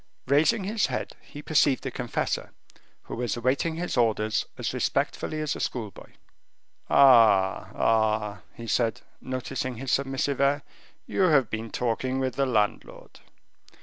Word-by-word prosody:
Raising 160 - +3
his 210 +2 0
head, - - -4
he 145 - -11
perceived 145 -4 +2
the 135 - -3
confessor, 120 -1 -3 0.5
who - - -7
was 120 -2 -2
awaiting 135 +7 0
his 170 -2 -3
orders 110 -2 +1
as - - -3
respectfully 155 - -1
as 155 -1 -1
a - - -7
school 110 -5 -3
boy. - - -15 0.8
"Ah, 110 -8 +5
ah!" 110 -3 +1
he 115 - -8
said, 115 -1 0 0.2
noticing 130 0 -4
his 130 +3 -4
submissive 140 0 0
air, 140 +1 +2 0.4
"you - - -2
have 135 -8 +3
been 110 0 -4
talking 125 +3 -1
with 130 -1 -1
the 135 -1 0
landlord." 105 -5 -2
130 Hz, 145 wpm, -26 LUFS, 115-140 Hz, 0.8 s, Ah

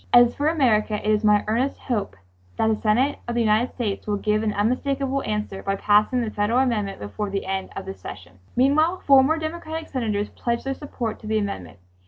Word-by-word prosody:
As 240 0 +6
for 290 - -1
America 235 -9 +2
it 210 - -5
is 215 0 +2
my 210 -1 +4
earnest 240 +6 0
hope 210 - -3 0.4
that - - +2
the 220 - +3
Senate 245 +7 +2
of 240 - -2
the 240 - +2
United 220 +2 +2
States 215 -5 -3
will 205 -1 0
give 210 +1 +1
an 220 -1 0
unmistakable 270 +6 0
answer 210 -4 -3
by 195 - -1
passing 210 +5 +3
the 225 -2 -2
federal 210 +4 0
amendment 225 -7 0
before 105 - -4
the 195 0 -3
end 190 0 -3
of - - -5
this 95 0 -8
session." 95 -1 -10 0.2
Meanwhile 310 +8 +3
four 270 -2 +7
more 315 +4 +2
Democratic 320 0 -5
Senators 215 -6 -1
pledged 235 +1 -2
their 270 - -1
support 255 -6 -5
to 215 - -10
the 220 0 +1
amendment. 100 - -4
220 Hz, 210 wpm, -23 LUFS, 205-265 Hz, 0.4 s, four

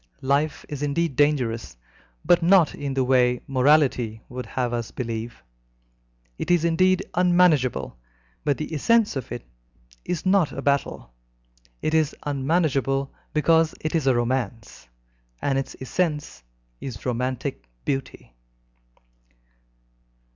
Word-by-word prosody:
Life 140 +3 0
is 145 -2 -6
indeed 145 +1 0
dangerous, 120 - +1 0.5
but 175 - +5
not 175 -2 +5
in 140 -2 -4
the 135 - +2
way 125 -1 +3
morality 130 -5 +2
would 125 0 -6
have 125 -2 -2
us 120 -2 -3
believe. 115 - -5 1.0
It - - -4
is 175 -2 +3
indeed 185 +3 +3
unmanageable, 175 - +2 0.4
but 145 -2 +1
the 155 +1 -5
essence 225 +7 +2
of 130 -4 -5
it - - -6 0.6
is 170 0 -3
not 185 -4 +3
a 135 - -5
battle. 140 - -1 0.7
It 155 - 0
is 155 -2 +2
unmanageable 140 -2 0 0.2
because 160 +1 +3
it 155 - -3
is 160 -5 0
a 130 - +4
romance, 120 - -3 0.5
and 135 -1 0
its 135 - -5
essence 150 - -2 0.4
is 120 -6 -7
romantic 125 - -3 0.2
beauty. 135 - -4
140 Hz, 120 wpm, -24 LUFS, 125-160 Hz, 1.0 s, but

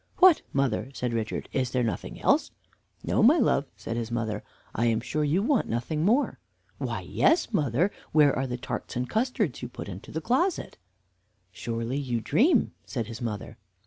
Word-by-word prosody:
"What, 370 -4 +7
mother," 135 -2 0
said 125 -1 -2
Richard, 110 -1 -2
"is 130 -2 0
there 125 0 0
nothing 115 - -3
else?" - - +3 0.5
"No, - - +1
my - - +7
love," - - +2
said 115 - -4
his 115 -1 -3
mother; 110 -3 -2 0.3
"I 120 +2 +1
am 115 -1 +2
sure 150 +5 -2
you 160 +7 +2
want 255 -1 +1
nothing 140 +7 -1
more." 235 +10 +2 0.4
"Why, - - -2
yes, 325 -7 +2
mother. 150 - +2 0.2
Where 150 -3 +5
are 130 +1 -1
the 125 0 -3
tarts - - -5
and 125 +1 -1
custards 220 - 0
you 120 - -5
put - - -8
into 95 -1 -8
the 160 - -2
closet?" 270 - 0 0.7
"Surely 115 +5 -3
you 125 -4 -1
dream?" 255 - +3
said 115 -4 -3
his 115 +2 -8
mother. 110 -4 -5
125 Hz, 175 wpm, -27 LUFS, 115-185 Hz, 0.7 s, What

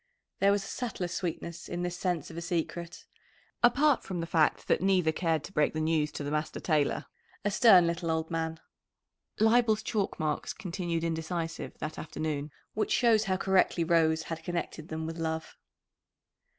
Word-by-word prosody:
There 200 +1 +5
was 200 -1 +1
a - - -8
subtler 230 -7 -3
sweetness 170 -1 -4
in 175 0 -3
this 175 0 -2
sense 175 -4 -2
of - - -10
a - - -3
secret, 170 0 -3 0.6
apart 280 +3 +4
from 185 -3 -4
the 165 - -2
fact 160 -2 +2
that - - +2
neither 185 -4 +3
cared 160 -2 0
to - - -9
break 150 -3 +1
the - - 0
news 155 -1 +1
to - - -4
the 145 - -3
master 155 +1 -2
tailor 150 -4 +1 0.4
a 205 - +2
stern 195 -5 +7
little 170 0 -1
old 160 0 -1
man. 160 0 -2 0.8
Leibel's 220 -1 +4
chalk 205 -4 -1
marks 155 -2 -1
continued 175 -3 -3
indecisive 165 0 -3
that 155 0 -5
afternoon; 155 -2 -3 0.2
which 215 - -1
shows 225 -3 +4
how 190 -2 +1
correctly 190 -2 +2
Rose 160 -1 +3
had 165 0 -6
connected 170 -2 -4
them 160 0 -4
with 165 +1 -5
love. 160 0 -3
170 Hz, 175 wpm, -30 LUFS, 160-190 Hz, 0.8 s, stern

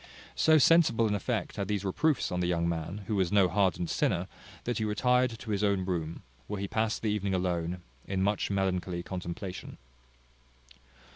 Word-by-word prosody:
So 160 0 +5
sensible 145 -7 +5
an 105 - +1
effect 100 - -2
had 100 - -2
these 100 -1 -1
reproofs 145 +10 +1
on 90 - -1
the 90 - +1
young 85 -1 +1
man, 85 +4 -3
who 110 - -1
was 95 -3 +1
no 100 -2 +5
hardened 95 -3 +1
sinner, - - 0 0.4
that 120 -1 -2
he - - 0
retired 125 +3 +2
to 110 - -7
his 100 0 0
own 100 -2 +2
room, 85 -3 -3 0.2
where 105 - -4
he 100 - -2
passed 110 +1 -1
the 110 - +1
evening 100 -2 0
alone, 90 -1 -1 0.2
in 95 -1 0
much 105 +1 0
melancholy 95 -3 -1
contemplation. 90 +1 -6
100 Hz, 180 wpm, -30 LUFS, 90-105 Hz, 0.4 s, So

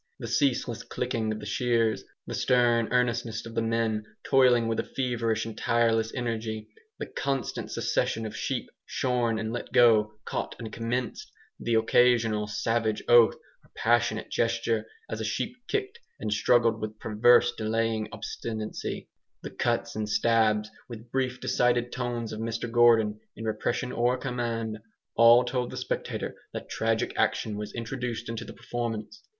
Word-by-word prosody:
The - - -7
ceaseless 125 -4 +1
clicking 115 -3 -2
of 110 - -4
the 105 - -8
shears 115 -1 +1 0.2
the - - -6
stern 120 -2 +3
earnestness 120 -2 0
of 115 - -8
the 115 - 0
men, 115 -1 0 0.2
toiling 125 -3 +4
with 115 -1 0
a - - +1
feverish 115 -4 -1
and 115 -1 -6
tireless 115 -1 +2
energy 115 -3 -3 0.3
the - - -4
constant 135 -4 -3
succession 115 0 0
of 110 - -6
sheep - - -3
shorn 120 -3 0
and 110 +1 -3
let 120 - -5
go, 110 -3 +5
caught - - -3
and 110 -1 -7
commenced 120 +1 -3 0.3
the 115 -1 0
occasional 115 -2 +3
savage 110 0 0
oath 120 -2 +7 0.3
or - - -24
passionate - - +1
gesture, 115 -1 0 0.2
as 110 - -4
a - - -2
sheep 110 - -2
kicked 415 +2 -2 0.2
and 105 -1 -1
struggled 115 0 +3
with 110 0 -5
perverse 120 +3 +4
delaying 110 0 -1
obstinacy 110 +1 -5 0.4
the - - -6
cuts - - -1
and 105 -1 -2
stabs, 110 -1 +2 0.2
with 115 0 -10
brief 130 -1 -1
decided 120 -1 +1
tones 120 -3 -3
of 110 - -5
Mr 115 +1 -3
Gordon, 115 -3 +4 0.2
in 110 - -7
repression 110 +3 -1
or 120 +1 +1
command 115 -4 -3 0.4
all 115 +2 +7
told 125 0 -1
the - - -7
spectator - - -3 0.2
that - - -6
tragic 115 0 0
action 110 - +1
was 105 0 -5
introduced 120 -1 -4
into 115 0 -4
the 105 - -9
performance. 120 - -5
115 Hz, 155 wpm, -28 LUFS, 110-120 Hz, 0.4 s, oath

